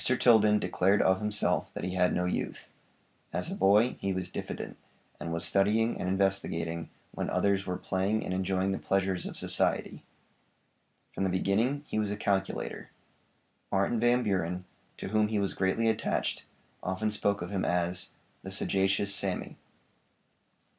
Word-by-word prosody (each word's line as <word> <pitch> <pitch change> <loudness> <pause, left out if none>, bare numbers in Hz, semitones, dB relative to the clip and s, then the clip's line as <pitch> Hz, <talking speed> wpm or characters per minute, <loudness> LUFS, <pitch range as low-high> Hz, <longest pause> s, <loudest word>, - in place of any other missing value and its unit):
Tilden 110 -4 +5
declared 100 0 +2
of 95 0 +3
himself 105 -6 0
that - - -5
he 90 +1 -2
had 90 -1 +3
no 90 - 0
youth. 90 - -3 0.6
As - - -2
a - - -3
boy 105 +6 +4
he 100 - -1
was 90 -1 -4
diffident, - - -5 0.4
and 85 - -4
was 85 0 -2
studying 105 +4 +2
and 90 - -1
investigating 85 -4 0 0.2
when - - -3
others 100 -1 +1
were 90 0 -1
playing 100 +4 -1
and - - -2
enjoying 95 +1 0
the 95 - -2
pleasures 95 -2 0
of - - -7
society. - - -1 1.1
From - - -2
the 95 - +2
beginning 110 +10 +1
he 110 - -2
was 105 -1 0
a 105 - -3
calculator. 95 -2 -2 0.8
Martin 100 +4 +1
Van 120 +2 +3
Buren, 90 -3 -1 0.3
to - - -5
whom 110 +1 +3
he 110 0 -1
was 100 -1 0
greatly 95 +4 +1
attached, 110 - 0 0.4
often 100 +4 -1
spoke 100 -2 0
of 90 - -6
him 95 -2 -1
as 90 +1 0 0.3
'The 95 - -7
sagacious 100 +1 +2
Sammy.' - - -2
95 Hz, 155 wpm, -30 LUFS, 95-105 Hz, 1.1 s, Tilden